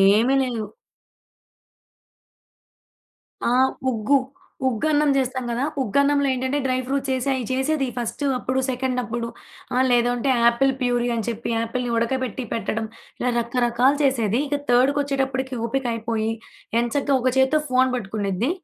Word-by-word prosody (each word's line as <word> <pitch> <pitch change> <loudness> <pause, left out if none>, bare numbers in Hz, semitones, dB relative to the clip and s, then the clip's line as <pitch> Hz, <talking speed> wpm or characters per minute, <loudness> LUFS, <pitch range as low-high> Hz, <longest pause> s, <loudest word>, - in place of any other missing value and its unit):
ఏమి 215 +7 +5
లేవు. 235 -4 -3 2.8
ఆ! - - +2 0.4
ఉగ్గు, 235 +4 +2 0.5
ఉగ్గన్నం 295 +5 +2
జేస్తాం 260 -1 -1
గదా! 240 +3 -1 0.2
ఉగ్గున్నంలో 280 +4 +2
ఏంటంటే 260 +2 -1
డ్రై 255 -1 +1
ఫ్రూట్స్ 275 +1 -1
ఏసీ 260 +1 -2
అయి 255 -2 -2
చేసేది 270 +2 0
ఫస్టు 240 +4 -3
అప్పుడు, 255 +1 -2
సెకండ్ 255 0 -1
అప్పుడు 235 0 -3 0.5
ఆహ్, 255 +1 +3
లేదు 240 0 +4
అంటే 245 +3 0 0.2
ఆపిల్ 265 +3 +2
ప్యూరీ 245 -1 +1
అని 225 -3 -2
చెప్పి 235 0 -3
ఆపిల్‌ని 240 +2 -3
ఉడకబెట్టి 255 +1 -1
పెట్టడం, 225 -1 -2 0.3
ఇలా 250 - +1
రకరకాలు 240 +3 +2
చేసేది. 240 -4 +2
ఇక 290 0 0
థర్డ్‌కొచ్చేటప్పటికి 265 0 +1
ఓపిక 270 +2 -2
అయిపోయి, 225 -1 -2 0.5
ఎంచక్క 270 +5 -1
ఒక 255 - +2
చేత్తో 265 +4 +4
ఫోన్ 255 0 +3
పట్టుకునిద్ది, 205 - -2
255 Hz, 130 wpm, -23 LUFS, 235-270 Hz, 2.8 s, ఏమి